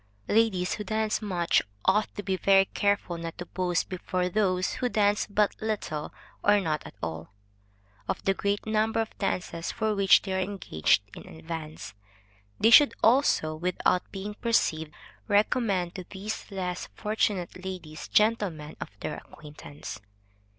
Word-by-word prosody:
Ladies 205 -5 +2
who 210 - -4
dance 220 +1 -1
much, 180 -5 +2 0.2
ought 210 +2 +4
to 205 - -5
be 190 -1 0
very 195 +1 +5
careful 200 -4 0
not 165 0 -6
to 175 - -6
boast 180 -1 -1
before 180 0 -2
those 185 -2 +1
who 250 - +1
dance 205 -2 +2
but 205 0 +1
little 200 -9 -3 0.3
or 205 0 +5
not 155 -5 -1
at - - -13
all, 80 0 -4 0.8
of - - -1
the 195 - +3
great 200 +1 -1
number 220 +1 +1
of 225 -1 -2
dances 180 -4 -2
for 220 -1 0
which 195 -2 +5
they 190 - -3
are 190 - 0
engaged 185 - +1
in - - -11
advance. 160 -6 -7 0.7
They 225 - +5
should 290 +3 +8
also, 225 - +4
without 180 +2 0
being 200 +2 -5
perceived, 160 -9 0 0.4
recommend 205 -4 +2
to 185 - -6
these 205 +3 -6
less 180 -3 -4
fortunate 200 -4 -1
ladies, 160 -5 -7
gentlemen 205 -9 +1
of - - -4
their - - -3
acquaintance. 145 -6 -10
190 Hz, 150 wpm, -28 LUFS, 170-210 Hz, 0.8 s, should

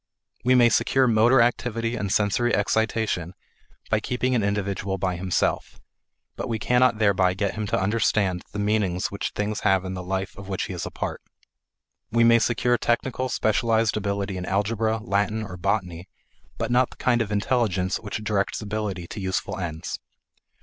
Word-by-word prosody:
We 130 +1 +4
may 120 -1 +6
secure 130 +4 +3
motor 120 +2 +5
activity 115 -1 -1
and 100 -4 -3
sensory 105 +4 +2
excitation 105 -4 0 0.6
by 110 - +3
keeping 125 +3 -1
an 120 - +2
individual 100 -1 -1
by 95 -1 -1
himself, 90 +1 -1 0.6
but - - -5
we 115 - 0
cannot 125 0 +3
thereby 95 -4 +3
get 100 0 -1
him 105 -1 -3
to - - 0
understand 100 -2 +1
the 105 - -6
meaning 105 -3 0
which 100 - -3
things 105 0 -2
have 95 -1 +2
in 95 - -4
the 90 - -5
life 95 +1 -3
of 100 0 -9
which 95 - -2
he - - -5
is 85 - -4
a - - -5
part. - - -5 0.9
We 115 +1 +3
may 115 0 +6
secure 120 +1 +1
technical 130 +2 0
specialized 110 0 +1
ability 100 -2 -2
in 90 - -4
algebra, 110 +3 0
Latin, 105 +1 0
or 95 -4 -7
botany, 90 -2 -2 0.5
but - - -2
not 125 +1 +3
the - - -15
kind 120 -2 +2
of 105 -2 -3
intelligence 100 -4 0
which 105 0 -6
directs 100 -2 0
ability 105 -4 -3
to 95 - -8
useful 95 +1 -2
ends. 80 -3 -4
105 Hz, 170 wpm, -25 LUFS, 95-115 Hz, 0.9 s, may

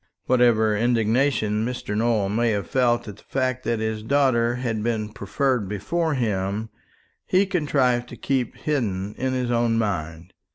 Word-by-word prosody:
Whatever 115 -4 +3
indignation 115 -1 +1
Mr. 120 -3 -3
Nowell 110 -2 +1
may 115 +3 +1
have 100 -4 -1
felt 120 +1 +1
at 105 -1 -8
the - - -19
fact 130 -1 -2
that 115 - 0
his 110 -1 -2
daughter 120 -1 +2
had 120 -4 -2
been 110 -2 -1
preferred 110 +1 -1
before 150 - -1
him, 105 -2 -1 0.6
he 190 +2 +3
contrived 135 -9 +1
to - - -9
keep 130 -3 -1
hidden 105 -9 -2
in 130 +1 -2
his 125 -1 -1
own 115 -1 +2
mind. 85 -5 -3
115 Hz, 155 wpm, -24 LUFS, 105-130 Hz, 0.6 s, Whatever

